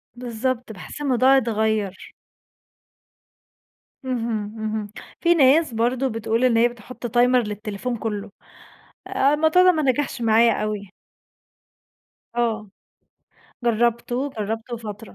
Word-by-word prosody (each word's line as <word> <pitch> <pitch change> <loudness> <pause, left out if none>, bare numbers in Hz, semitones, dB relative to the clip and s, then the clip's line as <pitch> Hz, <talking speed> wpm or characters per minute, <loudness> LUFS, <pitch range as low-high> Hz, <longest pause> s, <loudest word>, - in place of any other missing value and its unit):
بالضبط. 245 0 -3
باحس 200 +8 -9
الموضوع 265 -1 +4
أتغير. 220 -5 -1 1.9
اهم. 235 -4 -2 0.2
اهم. 215 -1 -3 0.3
في 345 0 +5
ناس 295 -2 +4
برضو 245 +4 0
بتقول 225 +1 -1
إن 240 -2 +3
هي 235 +1 +5
بتحط 240 +1 -8
timer 250 +1 +5
للتليفون 210 +3 -4
كلّه، 210 -2 -4 0.8
الموضوع 310 +6 +4
ده 365 - +7
ما 315 -3 -1
نجحش 275 -1 0
معايا 230 +1 +4
أوي. 205 -3 -4 1.5
آه، 225 -2 0 1.1
جربته 235 +1 +1 0.3
جربته 225 +3 -4
فترة. 210 0 -8
235 Hz, 105 wpm, -23 LUFS, 220-255 Hz, 1.9 s, ده